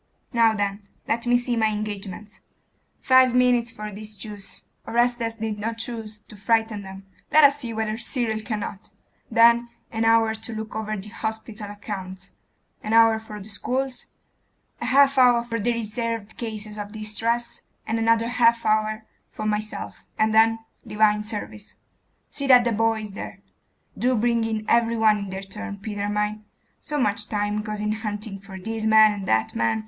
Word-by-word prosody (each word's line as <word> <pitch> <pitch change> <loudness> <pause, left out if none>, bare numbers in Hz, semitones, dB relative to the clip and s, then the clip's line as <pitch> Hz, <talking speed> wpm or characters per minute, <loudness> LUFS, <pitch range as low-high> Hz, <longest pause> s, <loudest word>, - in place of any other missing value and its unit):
Now 230 -2 +4
then, 200 0 -2 0.2
let 235 +1 -1
me 245 0 +5
see 245 0 -1
my 220 -1 +2
engagements; 210 -1 -5 0.6
five 260 -1 +5
minutes 245 -2 +3
for 210 -1 -7
these 210 +1 -9
Jews 205 -2 -9 0.2
Orestes 240 -1 +1
did 220 -2 -4
not 225 +2 -3
choose 220 -2 -4
to - - -14
frighten 220 +1 0
them: 190 0 -10 0.3
let 310 - +7
us 285 0 +6
see 240 -4 -4
whether 220 0 -2
Cyril 235 -2 -1
cannot; 215 -3 -5 0.4
then 235 +1 +5 0.2
an 225 0 -1
hour 225 -1 +4
to 220 +1 -6
look 220 0 -6
over 215 0 -3
the 195 +2 -8
hospital 220 -1 -5
accounts; 195 -2 -7 0.5
an 215 - -3
hour 225 -1 +6
for 215 -1 -9
the 200 - -10
schools; 255 +5 -3 0.7
a - - -2
half 275 0 +5
hour 245 -2 +5
for 230 -1 -3
the 240 +3 +1
reserved 230 -1 -3
cases 215 -2 -5
of 205 +1 -6
distress; 225 +2 -2 0.2
and 225 +1 -1
another 230 0 +3
half 235 -1 +3
hour 215 0 +1 0.2
for 215 - -7
myself; 210 0 -3 0.2
and 215 0 +2
then 225 +1 +5 0.3
divine 210 0 +2
service. 210 -1 -6 0.6
See 280 -1 -2
that 250 -2 +7
the 235 - +1
boy 225 0 +1
is 210 -2 -7
there. - - -8 0.5
Do 255 +1 +1
bring 235 0 +1
in 220 -1 -2
every 230 0 +3
one 215 -1 +4
in 200 -1 -5
their 190 +1 -5
turn, 205 +1 -7
Peter 205 0 -4
mine. 210 +1 -1 0.4
So 300 -1 -4
much 210 -5 +1
time 210 0 -1
goes 210 -1 -5
in 210 0 0
hunting 210 -2 -4
for 195 -1 -10
this 225 +3 -5
man 220 0 +7
and 200 -2 -5
that 110 0 +1
man.... 115 -1 +1
220 Hz, 175 wpm, -24 LUFS, 210-230 Hz, 0.7 s, let